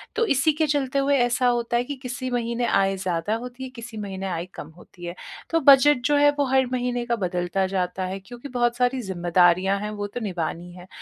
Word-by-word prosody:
तो 460 - +2
इसी 275 +4 +3
के 310 0 0
चलते 275 -1 0
हुए 280 0 +2
ऐसा 245 +1 +2
होता 240 -1 +1
है 240 - +1
कि 285 +2 -5
किसी 255 +1 -4
महीने 235 0 -1
आय 195 0 +2
ज़्यादा 185 +2 -1
होती 250 +2 -7
है, 260 - -6
किसी 235 -3 -10
महीने 195 -2 -5
आय 170 -1 -3
कम 150 - -8
होती 175 0 -13
है। 175 +1 -6 0.3
तो 330 - +2
बजट 280 -2 +6
जो 295 0 +3
है 290 0 +6
वो 285 - +3
हर 265 -1 +4
महीने 245 -1 -1
का 235 -1 0
बदलता 180 -1 -1
जाता 185 0 -2
है, 190 +1 -4
क्योंकि 240 +7 -10
बहुत 240 -1 0
सारी 250 +1 +1
ज़िम्मेदारियाँ 185 0 +2
हैं 210 +1 -4
वो 205 -1 -4
तो 225 - -6
निभानी 175 -2 -4
है। 180 0 -12
235 Hz, 225 wpm, -24 LUFS, 190-255 Hz, 0.3 s, बजट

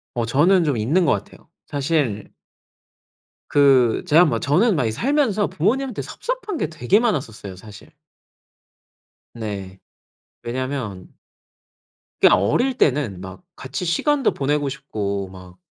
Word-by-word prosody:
어 115 -1 -1
저는 170 +9 +3
좀 145 -5 0
있는 145 +12 +1
것 - - +3
같아요. - - -6 0.2
사실 140 -7 -1 1.2
그 135 -5 +4
제가 165 +4 +6
뭐 115 -8 0
저는 180 - +2
막 135 - +1
이 - - 0
살면서 240 - +1
부모님한테 245 - -1
섭섭한 - - -5
게 - - 0
되게 155 - +2
많았었어요 120 - -2
사실. 105 +2 -14 1.4
네. 100 -4 -6 0.7
왜냐면 120 -6 -5 1.1
그냥 - - +6
어릴 245 - +1
때는 125 - +1
막 95 - -10
같이 135 +7 -5
시간도 270 - +1
보내고 145 +1 0
싶고 105 -8 -4
막 90 -1 -13
140 Hz, 240 characters per minute, -21 LUFS, 110-180 Hz, 1.4 s, 제가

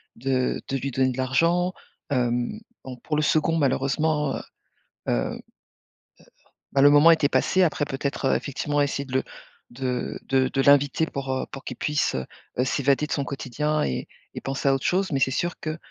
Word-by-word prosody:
de 130 +1 -1
de 135 - -1
lui 140 +1 -3
donner 130 +1 +2
de 125 - -7
l'argent. 165 +8 +2 0.4
Hem, 125 - 0 0.2
bon, 130 -1 -8
pour 150 +5 -3
le 150 - +2
2d 155 +2 +2
malheureusement, 145 +1 +1
heu, - - -4 0.7
heu, - - 0 1.3
bah 135 - +2
le 145 - +8
moment 145 +3 +7
était 155 -3 +3
passé, 185 +4 +2
après, 150 -3 +1
peut-être, 140 0 -3
heu, 135 - +3
effectivement, 145 +1 -1
essayer 140 0 -1
de 130 - -10
le 130 - +2 0.5
de 125 0 -3
de 130 -1 +2
de 135 +1 0
l'inviter 140 +2 +4
pour, 135 -3 -4
heu, 130 - -1
pour 135 - -8
qu'il 125 - -6
puisse, 150 -1 0
heu 65 - -2 0.3
heu, 125 - +3
s'évader 140 +2 +1
de - - -12
son 140 - 0
quotidien 145 +3 -2
et 65 - -2 0.3
et - - -6
penser 135 +1 -2
à - - +4
autre 135 - -2
chose, 185 0 +1
mais 140 - +1
c'est 130 0 +2
sûr 175 +6 -2
que 155 0 -4
140 Hz, 190 wpm, -25 LUFS, 130-150 Hz, 1.3 s, le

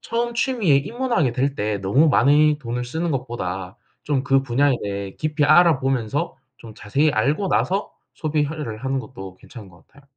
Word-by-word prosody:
처음 235 0 -2
취미에 230 - +2
입문하게 220 - -1
될 135 +3 -1
때 105 -2 -2
너무 105 +12 +3
많이 150 +1 +4
돈을 125 -1 -4
쓰는 160 +7 -3
것보다 95 -8 -4 0.3
좀 145 -2 -1
그 135 0 +3
분야에 135 +2 +2
대해 100 -1 -4
깊이 155 -1 0
알아보면서 145 -3 +2 0.2
좀 110 -2 -13
자세히 135 +9 0
알고 145 - 0
나서 195 +3 0 0.2
소비화를 150 -7 -3
하는 135 0 -1
것도 95 -6 -9
괜찮은 110 -1 -13
것 85 -2 -20
같아요. 140 - -21
135 Hz, 350 characters per minute, -22 LUFS, 115-155 Hz, 0.3 s, 많이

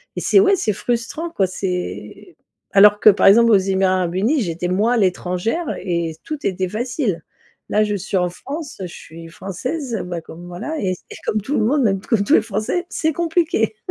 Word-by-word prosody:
et - - -3
c'est, 400 - +4
ouais, 395 0 +5
c'est 215 - -1
frustrant 240 - -3
quoi, 200 - +1
c'est 185 - -5 0.4
alors 205 +1 +6
que - - +7
par 195 - +3
exemple, 230 +4 +6
aux 210 - +7
Émirats 190 0 +1
arabes 175 -1 -2
unis, 240 +9 +1
j'étais, 175 -1 -3
moi, 215 +7 +1
l'étrangère 190 - -1
et 170 -3 -2
tout 305 -2 -6
était 185 -1 -1
facile. 225 - -2 0.5
Là, 215 - +3
je 210 - -1
suis 195 0 -2
en 180 -1 +1
France, 285 - -7
je - - -3
suis 165 -1 -11
française, 225 - -4
bah 175 -1 -4
comme, 170 +2 -11
voilà, 180 - -5
et 185 -2 0 0.2
et - - -7
comme 215 - 0
tout 275 +8 -2
le - - +1
monde, 275 +4 +2
même 195 -4 +1
comme 215 -1 +1
tous 285 - +1
les - - +6
Français, 220 - -2
c'est 315 0 -1
compliqué. 325 - 0
210 Hz, 200 wpm, -20 LUFS, 185-265 Hz, 0.5 s, que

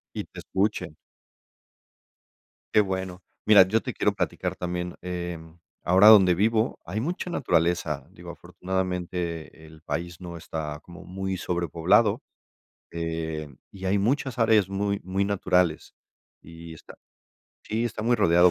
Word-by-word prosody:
Y - - -3
te - - -11
escuchen. 95 -5 -2 1.8
Qué 105 - +7
bueno. 95 -2 -3 0.2
Mira, 100 -3 +7
yo 110 +3 +1
te - - -4
quiero - - +1
platicar - - -3
también, 90 0 -4
eh, 90 -1 -4 0.4
ahora 95 +4 +5
donde 95 -5 +8
vivo 110 +4 +1
hay 100 +5 -3
mucha 175 +7 -3
naturaleza, 85 - 0
digo, - - -11
afortunadamente, 90 -3 -4
el 80 0 -16
país 85 +4 -5
no 85 -1 -7
está 75 -2 -5
como 90 +3 -13
muy 95 +1 -4
sobrepoblado, 85 -2 +1 0.7
eh, 80 -2 -4 0.2
y 95 -1 -7
hay 100 +2 +2
muchas 130 +4 0
áreas 110 -4 +4
muy 100 +1 -1
muy 95 +2 -1
naturales, 90 -4 0 0.5
y 85 0 -11
está - - -14 0.7
sí, 110 +2 -2
está 110 -2 -4
muy 120 +2 +2
rodeado 90 -3 +5
90 Hz, 135 wpm, -26 LUFS, 85-100 Hz, 1.8 s, donde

